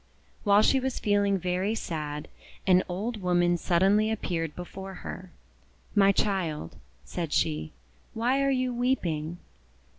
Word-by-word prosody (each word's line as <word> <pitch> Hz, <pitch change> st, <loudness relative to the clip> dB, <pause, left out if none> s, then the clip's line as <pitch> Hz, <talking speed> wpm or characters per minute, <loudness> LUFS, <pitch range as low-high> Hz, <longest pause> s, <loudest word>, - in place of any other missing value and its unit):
While 205 Hz, 0 st, +5 dB
she 270 Hz, -, +4 dB
was 265 Hz, -1 st, -2 dB
feeling 205 Hz, -1 st, +2 dB
very 185 Hz, +4 st, -1 dB
sad, 150 Hz, -6 st, -4 dB, 0.4 s
an 185 Hz, -1 st, +5 dB
old 210 Hz, +5 st, -3 dB
woman 175 Hz, -1 st, +3 dB
suddenly 195 Hz, +5 st, +3 dB
appeared 165 Hz, -7 st, -2 dB
before 190 Hz, +2 st, -7 dB
her. 185 Hz, -1 st, -7 dB, 0.6 s
"My 200 Hz, -1 st, +6 dB
child," 180 Hz, -, -1 dB, 0.3 s
said 165 Hz, -, -4 dB
she, 80 Hz, -, 0 dB, 0.4 s
"why 245 Hz, +5 st, +2 dB
are 275 Hz, -, +2 dB
you 255 Hz, -2 st, +1 dB
weeping?' 175 Hz, -11 st, -1 dB
190 Hz, 125 wpm, -28 LUFS, 175-215 Hz, 0.6 s, My